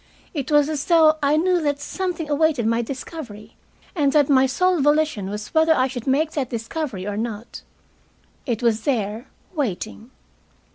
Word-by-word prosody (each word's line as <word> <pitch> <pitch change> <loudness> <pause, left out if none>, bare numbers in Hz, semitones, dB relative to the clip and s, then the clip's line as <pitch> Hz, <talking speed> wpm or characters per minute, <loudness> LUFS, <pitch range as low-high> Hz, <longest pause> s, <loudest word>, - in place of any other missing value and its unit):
It 285 -3 -4
was 295 -1 +5
as 300 -2 -3
though 320 -2 +5
I 290 +1 +3
knew 355 +2 +2
that 290 -2 0
something 350 +1 -3
awaited 295 -4 +1
my 230 +1 +2
discovery, 235 -4 -8 0.4
and 290 -6 +2
that 295 -2 +4
my 265 -1 +5
sole 365 +5 +1
volition 295 -8 +1
was 210 +1 -6
whether 320 0 +4
I 255 - +2
should 250 -2 -7
make 295 +4 +2
that 270 -5 -2
discovery 230 - -4
or 205 0 -3
not. 225 0 -5 0.9
It 235 -1 -2
was 225 -2 +2
there, 225 -2 -2 0.3
waiting. 225 - -4
280 Hz, 160 wpm, -22 LUFS, 230-310 Hz, 0.9 s, was